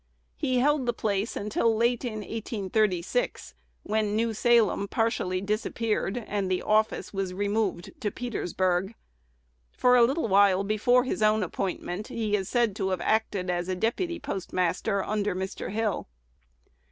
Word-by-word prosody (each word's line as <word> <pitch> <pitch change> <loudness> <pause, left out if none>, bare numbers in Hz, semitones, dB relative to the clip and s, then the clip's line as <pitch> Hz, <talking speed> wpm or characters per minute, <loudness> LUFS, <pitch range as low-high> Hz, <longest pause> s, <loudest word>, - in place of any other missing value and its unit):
He 260 -4 0
held 280 0 +2
the 240 - +2
place 210 -1 -1
until 215 +2 +1
late 235 +2 +1
in 215 -4 -3
1836, 215 - -1 0.3
when 210 -1 0
New 225 +1 +1
Salem 220 -3 +3
partially 195 -4 0
disappeared, 215 +1 -1
and 200 -2 -2
the 185 -1 0
office 215 0 +1
was 190 -2 -3
removed 205 -3 -1
to 210 - 0
Petersburg. 190 -4 -1 0.8
For 250 0 +4
a 245 - +7
little 270 +4 +1
while 195 -1 +4
before 230 +5 +3
his 255 - -3
own 215 0 +3
appointment, 185 +2 -3
he 215 -2 -1
is 195 -1 -2
said 235 -5 +1
to 190 -2 -1
have 185 -2 -1
acted 205 -4 0
as 175 0 -2
"deputy 335 - -1
postmaster" 185 +2 -1
under 210 -2 -1
Mr. 190 +1 -4
Hill. 215 0 -1
210 Hz, 140 wpm, -27 LUFS, 190-230 Hz, 0.8 s, a